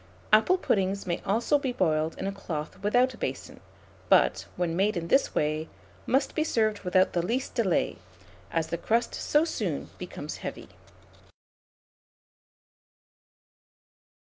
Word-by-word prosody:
Apple 225 +13 +6
puddings 195 - 0
may 175 -2 -2
also 230 +8 +2
be 270 -3 -2
boiled 160 -7 0
in - - -4
a 195 - -1
cloth 165 -6 -6
without 245 +5 +3
a - - -14
basin; - - -5 0.5
but, - - +4
when 170 -2 -1
made 200 +2 +1
in 170 0 -4
this 270 - +3
way, 155 +1 0 0.4
must 265 +3 +1
be 310 - +1
served 215 -8 +1
without 185 0 +2
the 175 - +1
least 245 +8 -2
delay, 190 - +1 0.5
as 160 +5 -1
the 170 - -2
crust 230 +5 +1
so 300 +2 +2
soon 330 - -3
becomes - - -6
heavy. - - -7
200 Hz, 135 wpm, -28 LUFS, 170-245 Hz, 0.5 s, Apple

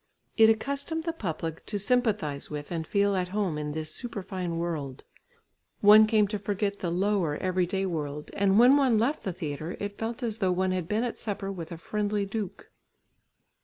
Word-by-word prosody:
It 220 -1 +7
accustomed 280 +8 -1
the 330 0 -2
public 165 - -4
to 210 - -1
sympathise 205 - 0
with 150 +1 -6
and 165 -2 -3
feel 200 -1 +2
at 180 -1 0
home 185 -5 -1
in 150 0 -3
this 155 0 -3
superfine 185 -7 -4
world; 150 -6 -4 0.8
one 215 +1 +8
came 215 -2 +3
to 210 -1 -2
forget 200 0 -2
the 175 - -2
lower 180 -4 +1
everyday 185 +1 0
world, 150 -4 -4
and 195 0 +3
when 250 +5 +7
one 260 -5 +3
left 250 +8 +1
the 190 - -3
theatre 155 0 -5
it 205 0 -5
felt 230 +3 -4
as 225 -2 -2
though 190 -3 +2
one 185 +1 +1
had 180 -3 -2
been 215 +4 0
at 245 - -3
supper 200 -2 -3
with 175 -4 -7
a 170 - -5
friendly 205 +3 -1
duke. 200 -1 -5
195 Hz, 185 wpm, -28 LUFS, 170-215 Hz, 0.8 s, one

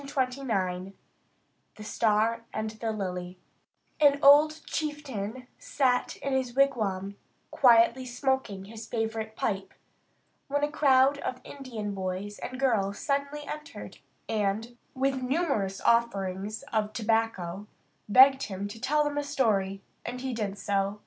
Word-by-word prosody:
CHAPTER 260 -1 -1
XVI 190 -6 -2 0.8
THE 215 - -10
STAR 220 +1 +1
AND 215 0 -3
THE 225 0 -3
LILY 180 -3 -4 0.6
An 285 -2 +5
old 300 +3 +7
chieftain 260 -7 -4
sat 255 -3 0
in 275 - -1
his 255 -2 -1
wigwam, 205 -8 +1 0.3
quietly 245 0 +5
smoking 250 -6 -1
his 225 +2 -9
favourite 220 -1 -3
pipe, 195 -3 -3 0.7
when 285 +1 -1
a 295 - +1
crowd 275 -2 +4
of 255 -2 -4
Indian 230 -7 -6
boys 190 +2 -4
and 255 +1 -6
girls 205 -7 +1
suddenly 280 +1 -2
entered, 300 +2 -8 0.3
and, 220 +2 -1 0.2
with 265 0 0
numerous 255 - 0
offerings 210 -2 0
of 215 -1 0
tobacco, 215 -4 -1 0.4
begged 265 +4 +7
him 200 0 -4
to 225 +2 -10
tell 300 +4 +2
them 290 0 -1
a - - -2
story, 205 -9 0 0.2
and 250 +1 -5
he 260 -1 -3
did 205 -3 -3
so. 200 +1 -1
230 Hz, 130 wpm, -28 LUFS, 200-270 Hz, 0.8 s, old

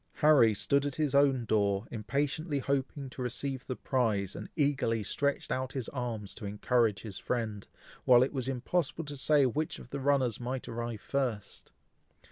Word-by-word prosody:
Harry 150 -7 +5
stood 140 +7 +1
at 145 -2 -2
his 150 -3 0
own 140 -3 +4
door, 100 -1 +1
impatiently 145 - -1
hoping 140 +1 -2
to 130 0 -8
receive 130 +2 -3
the 130 - -2
prize, 110 -9 0
and - - -7
eagerly 140 -7 +1
stretched 140 +7 -1
out 130 0 -2
his 130 -4 -3
arms 115 -6 -4
to - - -11
encourage 105 0 +1
his 105 -4 -7
friend, 110 -5 -3 0.4
while 125 -1 +7
it 135 - -2
was 130 -3 -2
impossible 145 +5 -1
to 145 0 -5
say 145 +1 +3
which 150 +5 -1
of 120 - -13
the 140 - -3
runners 135 -4 +2
might 125 +1 -4
arrive 120 -2 -4
first. 120 -8 -3
130 Hz, 170 wpm, -31 LUFS, 115-140 Hz, 0.4 s, while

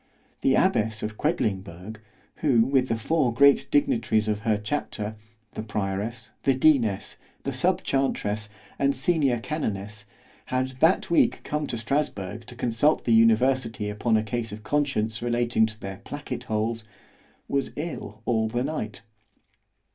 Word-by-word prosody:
The - - +3
abbess 110 0 +2
of 105 0 -3
Quedlingberg, 100 - -2 0.4
who 130 -7 +3
with 130 -1 +2
the 115 - 0
four 140 +2 +1
great 140 +4 +5
dignitaries 115 -6 +2
of 105 -1 0
her 110 -2 +1
chapter, 105 -2 -3 0.4
the - - -5
prioress, 105 +2 -3
the 135 - +2
deaness, 130 -8 +2 0.3
the - - -2
sub - - +1
chantress, 110 -6 0 0.3
and 140 0 +2
senior 140 -3 +2
canonness, 105 -7 -4 0.4
had 130 0 0
that 190 +5 +3
week 170 - +3
come 150 0 -2
to 120 - -3
Strasburg 115 -4 -2
to 125 - -9
consult 120 +6 +2
the 115 - +2
university 115 -1 +3
upon 110 +2 +1
a 110 - 0
case 115 0 -3
of 105 +1 -8
conscience 115 -5 0
relating 120 -1 +2
to 110 0 -9
their 95 0 -6
placket 145 0 -6
holes——was 110 +4 -4
ill 115 -9 -6
all 110 -2 +1
the 120 +3 -1
night. 130 -8 -4
115 Hz, 140 wpm, -26 LUFS, 110-135 Hz, 0.4 s, great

